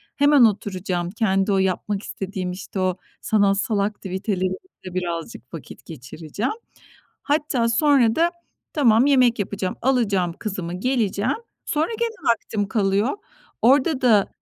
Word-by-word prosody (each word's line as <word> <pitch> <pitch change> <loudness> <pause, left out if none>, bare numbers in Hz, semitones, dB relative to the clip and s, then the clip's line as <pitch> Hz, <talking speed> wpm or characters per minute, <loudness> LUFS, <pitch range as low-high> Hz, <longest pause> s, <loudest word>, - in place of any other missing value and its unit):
hemen 285 -3 +6
oturacağım. 185 -4 -1
Kendi 195 -2 +1
o 195 - +3
yapmak 190 +2 -1
istediğim, 190 -2 -4
işte, 190 +1 -6
o 185 -1 0 0.2
sanatsal 205 +1 +2
aktiviteleriyle 190 -2 -2 0.3
birazcık 170 -8 -5
vakit 165 - -10
geçireceğim. 160 - -5 0.7
Hatta 285 -5 +1
sonra 245 -2 +3
da 340 +1 +2 0.4
tamam, 240 -5 +4
yemek 255 -5 +4
yapacağım, 200 -2 -3
alacağım 200 -9 +1
kızımı, 185 -5 -4
geleceğim, 230 - 0 0.3
sonra 310 +2 0
gene 465 -1 -1 0.2
vaktim 215 -3 -2
kalıyor. 205 - +1 0.4
Orada 270 +3 +3
da 220 -6 +4
205 Hz, 115 wpm, -22 LUFS, 185-250 Hz, 0.7 s, hemen